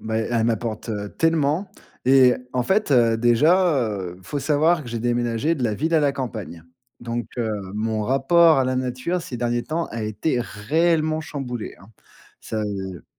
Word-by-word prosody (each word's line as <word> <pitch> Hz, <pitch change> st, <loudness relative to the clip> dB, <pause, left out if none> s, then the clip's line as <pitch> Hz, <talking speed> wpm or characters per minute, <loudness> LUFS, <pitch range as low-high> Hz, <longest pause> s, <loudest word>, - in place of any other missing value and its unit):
bah, 110 Hz, 0 st, -3 dB
elle 115 Hz, 0 st, 0 dB
m'apporte, 115 Hz, 0 st, -2 dB
heu, 105 Hz, -2 st, -4 dB
tellement 165 Hz, +3 st, +1 dB, 0.4 s
et 130 Hz, -1 st, +6 dB, 0.2 s
en 125 Hz, -, +1 dB
fait, 200 Hz, -, +1 dB
heu, 120 Hz, -4 st, +4 dB
déjà, 140 Hz, +4 st, +3 dB
heu, 95 Hz, -4 st, -5 dB
faut 145 Hz, +11 st, -4 dB
savoir 155 Hz, +3 st, +2 dB
que 125 Hz, -, -10 dB
j'ai 115 Hz, 0 st, -3 dB
déménagé 120 Hz, +5 st, 0 dB
de 140 Hz, -, -5 dB
la 110 Hz, -3 st, 0 dB
ville 160 Hz, +9 st, -1 dB
à 160 Hz, -, +5 dB
la 145 Hz, -1 st, +3 dB
campagne. 110 Hz, -11 st, -6 dB, 0.4 s
Donc, 120 Hz, -1 st, -4 dB
heu, 115 Hz, -2 st, -1 dB, 0.2 s
mon 110 Hz, +1 st, -2 dB
rapport 155 Hz, +7 st, +4 dB
à 135 Hz, -, +2 dB
la 130 Hz, 0 st, 0 dB
nature 130 Hz, +8 st, -2 dB
ces 130 Hz, -6 st, -6 dB
derniers 120 Hz, 0 st, -1 dB
temps 165 Hz, +5 st, -2 dB
a 115 Hz, -, -4 dB
été 110 Hz, +5 st, -1 dB
réellement 155 Hz, +8 st, 0 dB
chamboulé 130 Hz, -7 st, -6 dB
hein. -, -, -15 dB, 0.5 s
Ça, 110 Hz, -1 st, -4 dB
heu 95 Hz, -4 st, -5 dB
120 Hz, 180 wpm, -23 LUFS, 110-155 Hz, 0.5 s, et